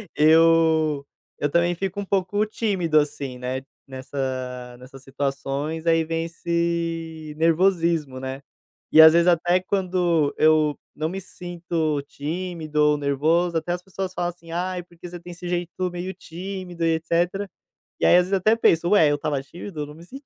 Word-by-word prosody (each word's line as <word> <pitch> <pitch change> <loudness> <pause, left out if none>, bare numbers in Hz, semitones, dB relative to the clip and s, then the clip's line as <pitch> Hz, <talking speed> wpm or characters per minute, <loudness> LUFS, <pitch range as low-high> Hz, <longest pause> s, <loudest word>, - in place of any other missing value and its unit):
Eu 160 -1 +4 0.3
eu 145 - 0
também 170 +2 +2
fico 195 +3 -3
um 200 - -3
pouco 200 +2 0
tímido, 190 -8 0
assim, 140 -3 -3
né, 130 +1 -3 0.3
nessa 130 -2 -5
nessas 130 +1 -13
situações. 140 +3 -3
Aí, 165 0 +4
vem 165 0 -2
esse 165 -2 -3
nervosismo, 165 -4 +2
né? 130 +1 -5 0.5
E, 160 - +9
às 160 0 +10
vezes, 170 +1 +4
até 175 +1 +3
quando 180 -5 +1
eu 155 -1 +3 0.2
não 155 +1 -2
me 190 +3 -4
sinto 170 -4 -3
tímido 160 0 -4
ou 150 0 +4
nervoso, 160 +5 +1
até 175 +2 -2
as 180 - -5
pessoas 190 0 -5
falam 175 -1 -1
assim: 170 -1 -12
"Ai, 180 +1 -2
porque 175 0 -12
você 175 0 -8
tem 175 +1 -10
esse 175 +1 -8
jeito 175 +1 -2
meio 175 +2 -5
tímido 180 -1 -6
e 165 - +3
etcétera". 175 +5 -1 0.5
E - - +1
aí, - - +6
às 180 0 +3
vezes, 195 - -4
até 195 +3 +3
penso: 170 -6 +3
"Ué, 165 -8 +6
eu 145 - +2
estava 145 -1 -2
tímido? 165 +4 -9
Eu 150 - -2
não 150 - -11
me 165 - -13
senti 270 +9 -11
165 Hz, 170 wpm, -23 LUFS, 150-180 Hz, 0.5 s, às